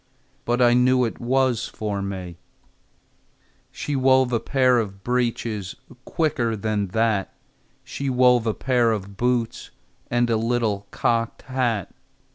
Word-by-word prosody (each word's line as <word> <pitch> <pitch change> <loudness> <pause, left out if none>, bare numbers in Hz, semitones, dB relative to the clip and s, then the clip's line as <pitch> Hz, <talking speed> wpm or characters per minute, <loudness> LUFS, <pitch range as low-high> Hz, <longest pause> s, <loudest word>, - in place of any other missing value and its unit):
But 120 +1 +2
I 120 0 +5
knew 125 0 +4
it 115 - -5
was 130 -1 +1
for 105 -2 -4
me. 95 -3 -6 1.3
She 145 - -4
wove 130 -1 +3
a 115 - +2
pair 130 -1 +2
of 100 -3 -5
breeches 115 -5 -2 0.3
Quicker 145 -9 0
than 105 -1 -1
that! 110 0 0 0.5
She 140 -1 -4
wove 125 -2 +4
a 110 - 0
pair 125 -3 +2
of 100 -1 -6
boots 120 +1 -1 0.4
And 120 0 +2
a 115 - +2
little 110 -3 -1
cocked 115 -1 -1
hat. 120 -7 -2
120 Hz, 130 wpm, -23 LUFS, 105-125 Hz, 1.3 s, I